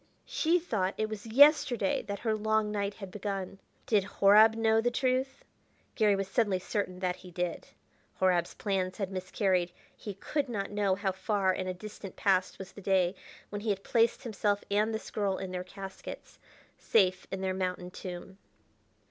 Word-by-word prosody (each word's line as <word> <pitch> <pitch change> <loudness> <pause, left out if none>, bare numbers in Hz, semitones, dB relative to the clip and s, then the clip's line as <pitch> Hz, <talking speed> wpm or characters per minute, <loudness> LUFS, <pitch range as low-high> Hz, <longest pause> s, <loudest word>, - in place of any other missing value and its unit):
She 335 +2 +2
thought 200 - -1
it 215 0 -1
was 215 0 -6
yesterday 250 -4 +5
that 200 0 -3
her 220 -2 +1
long 215 0 +1
night 200 -1 -2
had 195 -3 -8
begun. 195 -2 -4 0.3
Did 210 -3 +3
Horab 210 +3 +6
know 225 0 +3
the 245 - +2
truth? 260 +2 -1 0.5
Garry 210 -3 +3
was 195 -1 -2
suddenly 200 -2 +1
certain 185 0 -3
that 180 -1 -1
he 180 0 -12
did. 180 0 -3 0.5
Horab's 180 -2 +2
plans 185 -3 -1
had 195 -2 -3
miscarried; 185 -1 0 0.2
he 205 -3 -7
could 280 +7 -2
not 205 -4 -3
know 205 -2 +1
how 195 0 -1
far 190 0 0
in 185 0 -3
a 185 - -1
distant 200 0 -9
past 185 -2 +1
was 190 0 -9
that 200 - -12
day 185 -2 +2 0.4
when 205 0 -5
he 220 - -2
had 195 -1 -1
placed 230 +2 +2
himself 205 -3 0
and 210 +2 +2
this 220 -1 -5
girl 200 -3 0
in 190 -1 -5
their 180 0 -3
caskets, 195 +1 -9 0.4
safe 185 -4 +2
in 190 - -4
their 190 0 0
mountain 180 -1 -3
tomb. 185 +1 -8
200 Hz, 175 wpm, -30 LUFS, 185-220 Hz, 0.5 s, Horab